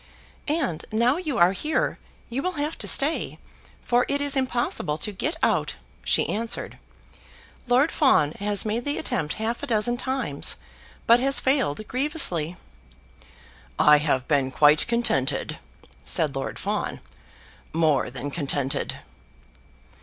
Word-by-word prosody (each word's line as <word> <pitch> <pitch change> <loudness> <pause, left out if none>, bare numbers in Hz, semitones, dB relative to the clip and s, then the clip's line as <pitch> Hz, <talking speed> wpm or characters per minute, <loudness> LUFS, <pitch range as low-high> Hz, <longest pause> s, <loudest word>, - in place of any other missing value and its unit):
"And 285 - -1
now 235 +6 +2
you 310 -7 -3
are 175 +1 +5
here, 305 +11 -1 0.3
you 245 +3 -3
will 365 +3 -2
have 300 0 -3
to - - +1
stay, 295 +4 +3 0.5
for 245 0 +2
it 285 - 0
is 285 0 0
impossible 245 - -1
to 210 - -4
get 305 - -2
out," - - +1 0.3
she - - +1
answered. 230 +2 -4 0.9
"Lord 255 +6 +3
Fawn 265 - +3
has 205 0 +1
made 220 +3 -1
the 285 +2 -2
attempt 150 - -2
half 225 +2 -3
a - - -5
dozen 240 +1 +1
times, 260 +1 -1 0.5
but 235 +1 +6
has 270 +1 +4
failed 255 - 0
grievously." 255 - 0 1.2
"I 150 0 +6
have 135 -4 0
been 140 -3 +1
quite 150 +3 +4
contented," 155 - 0 0.4
said 150 -4 +1
Lord 135 - -4
Fawn; - - -3 0.7
"more 155 -6 +2
than 130 +3 -6
contented." 140 -3 -1
230 Hz, 130 wpm, -24 LUFS, -, 1.2 s, but